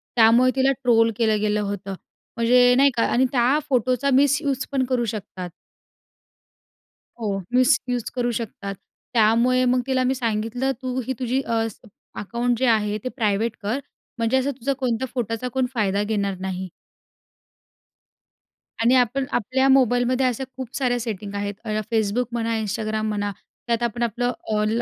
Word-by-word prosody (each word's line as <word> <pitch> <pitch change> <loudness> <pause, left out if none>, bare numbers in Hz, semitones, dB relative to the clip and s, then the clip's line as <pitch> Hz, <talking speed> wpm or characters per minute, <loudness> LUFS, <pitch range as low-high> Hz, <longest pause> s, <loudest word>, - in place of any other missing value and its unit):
त्यामुळे 235 +2 +5
तिला 265 0 +3
ट्रोल 230 -2 +4
केलं 220 -2 +2
गेलं 210 0 +1
होतं. 200 -1 -4 0.4
म्हणजे 245 +1 +5
नाही 275 +2 +5
का 230 - +2
आणि 255 +2 +3
त्या 255 +3 +3
फोटोचा 255 +1 +1
मिसयूज 280 0 +2
पण 270 -2 +1
करू 250 -2 0
शकतात. 200 -4 -6 1.7
हो, 205 -3 -1 0.2
मिसयूज 250 -2 +2
करू 245 -1 0
शकतात. 200 -3 -6 0.4
त्यामुळे 235 +3 +4
मग 250 0 +2
तिला 260 -1 +1
मी 260 +1 +1
सांगितलं, 230 +2 -1
"तू 255 0 -2
ही 260 - -2
तुझी 255 +1 0
अ, 230 -3 0
स - - -20 0.4
अकाउंट 235 +3 -1
जे 260 - +2
आहे 210 -2 +1
ते 255 - -2
प्रायव्हेट 220 -1 0
कर 215 +6 -1 0.4
म्हणजे 230 +2 +1
असं 265 +2 0
तुझा 275 +1 -2
कोणत्या 255 -1 -1
फोटोचा 245 +1 -2
फायदा 205 -3 +1
घेणार 200 -2 -1
नाही." 190 0 -4 2.1
आणि 240 +3 +4
आपण 255 +2 +2
आपल्या 260 +4 +1
मोबाईलमध्ये 255 0 +3
अशा 250 +1 -2
खूप 255 -2 -7
साऱ्या 245 -3 +1
सेटिंग 210 -3 -5
आहेत. 200 0 -2
अ, - - -5 0.2
Facebook 220 +2 +1
म्हणा, 230 -1 -1
Instagram 215 +1 -2
म्हणा. 205 -1 -2 0.4
त्यात 235 0 0
आपण 235 0 -1
आपलं 245 +2 0 0.2
ऑल 215 +2 +1
235 Hz, 150 wpm, -23 LUFS, 215-255 Hz, 2.1 s, त्यामुळे